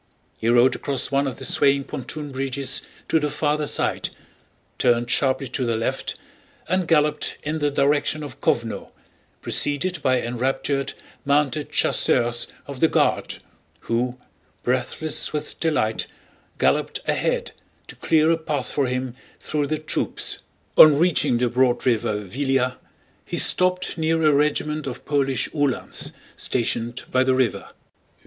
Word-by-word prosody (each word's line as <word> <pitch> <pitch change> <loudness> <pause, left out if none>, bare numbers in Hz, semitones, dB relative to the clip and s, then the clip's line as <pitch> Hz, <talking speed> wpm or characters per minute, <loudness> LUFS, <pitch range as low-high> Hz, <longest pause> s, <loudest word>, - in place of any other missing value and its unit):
He 115 - 0
rode 120 +2 +5
across 140 -1 -2
one 140 0 +2
of 130 - -5
the - - -4
swaying 140 -1 +3
pontoon 145 +3 -6
bridges 135 0 -1 0.3
to 160 - +3
the 150 -1 -1
farther 150 0 0
side, - - 0 0.7
turned 120 0 +2
sharply 135 0 +1
to 130 - -2
the 115 -2 0
left, 115 +1 -2 0.5
and 185 -2 0
galloped 150 -2 +1
in 155 +2 -2
the 145 -1 +1
direction 145 +2 +1
of 145 -3 -9
Kóvno, 115 -1 -1 0.5
preceded 155 +4 0
by 130 -2 +2
enraptured, 130 +3 -1 0.3
mounted 145 0 +1
chasseurs 120 -1 +2 0.2
of 140 -2 -8
the 160 - +5
Guard - - 0 0.4
who, 120 +2 -1 0.5
breathless 130 +6 0
with 150 0 -5
delight, 130 -9 0 0.5
galloped - - +1
ahead - - 0 0.3
to - - -10
clear 160 0 +3
a 165 - +2
path 155 -3 -3
for 140 -3 0
him 125 0 -3 0.3
through 150 -2 -2
the 155 - -1
troops. 155 +1 -2 0.4
On 150 -2 +10
reaching 165 -7 +2
the 125 +1 +1
broad 125 0 +1
river 115 -4 +1
Víliya, 130 +5 -1 0.5
he - - -5
stopped 180 -1 +2
near 160 +1 +1
a 155 -1 +5
regiment 150 +1 0
of 130 0 -7
Polish 135 -3 +1
Uhlans 145 -4 -2 0.3
stationed 120 0 -1
by 130 0 +3
the 130 0 +2
river. 125 -7 0
140 Hz, 140 wpm, -23 LUFS, 125-150 Hz, 0.7 s, On